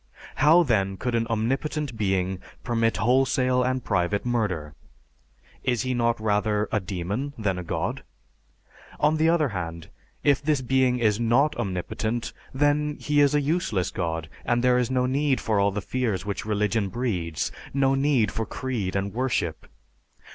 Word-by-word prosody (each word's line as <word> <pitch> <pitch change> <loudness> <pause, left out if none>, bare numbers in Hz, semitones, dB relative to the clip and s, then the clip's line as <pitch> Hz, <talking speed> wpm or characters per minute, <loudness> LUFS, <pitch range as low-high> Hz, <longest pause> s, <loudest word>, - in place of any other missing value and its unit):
How, 155 +5 +6
then, 100 - +1
could 125 +3 -2
an 115 -1 +1
omnipotent 135 +5 -1
being 95 -3 0 0.2
permit 115 -2 +1
wholesale 130 +1 +2
and 130 0 0
private 100 +4 0
murder? 100 -11 -1 0.9
Is 125 -2 +1
He 130 0 -1
not 120 -1 +1
rather 105 0 +1
a 105 - +2
demon 100 +9 -4
than 100 -5 -1
a - - -5
God? 85 - -2 1.0
On 150 +2 +3
the 160 +1 +3
other 160 -4 +2
hand, 85 -5 -5 0.3
if 140 -2 +3
this 145 -2 +1
being 130 0 +2
is 110 -3 +2
not 120 +6 +3
omnipotent, 110 +5 -3 0.2
then 145 +2 +1
He 145 0 +2
is 145 0 +4
a 145 - +3
useless 140 - 0
god, 80 -3 -3 0.2
and 120 0 +1
there 125 0 +4
is 125 - 0
no 130 -1 +1
need 135 +1 +1
for 110 -2 0
all 100 0 +3
the 100 +1 -3
fears 110 -8 -1
which 100 -1 -3
religion 105 -1 0
breeds, 90 -9 -2 0.2
no 135 0 +2
need 135 -6 +2
for 110 +1 -3
creed 115 -8 -3
and 100 0 -1
worship. 120 -10 -1
120 Hz, 160 wpm, -25 LUFS, 100-130 Hz, 1.0 s, How